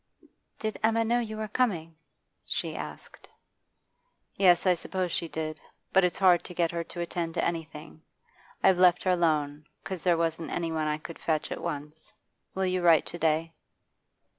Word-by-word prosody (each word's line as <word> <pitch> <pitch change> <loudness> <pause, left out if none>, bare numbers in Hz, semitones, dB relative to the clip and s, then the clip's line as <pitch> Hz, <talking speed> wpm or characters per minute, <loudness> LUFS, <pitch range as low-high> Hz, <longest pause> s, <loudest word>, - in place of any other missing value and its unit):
'Did 215 -1 -4
Emma 225 +1 +3
know 235 +2 +2
you 220 -2 -4
were 215 0 -3
coming?' 185 -9 -1 0.5
she - - -3
asked. - - -9 1.1
'Yes, 180 -2 +4
I 185 - +6
suppose 180 +1 -3
she 170 - -2
did. 155 -1 -5 0.3
But 190 - +5
it's 180 - +1
hard 180 -3 +5
to 180 - -9
get 170 -1 +1
her 170 -1 -2
to 175 - -6
attend 170 -1 -3
to - - +1
anything. 155 - -5 0.6
I've 190 -2 +5
left 180 -1 +5
her 185 - +2
alone, 150 -4 0 0.2
'cause 190 -3 -5
there 175 -1 +3
wasn't 165 0 -1
any 165 -1 -2
one 155 -1 -1
I 150 0 0
could 160 +1 -10
fetch 155 -2 -1
at - - -4
once. 150 -1 -6 0.4
Will 190 0 0
you 185 0 0
write 165 -3 +5
to 170 - -8
day? 160 +1 +1
170 Hz, 175 wpm, -28 LUFS, 160-185 Hz, 1.1 s, I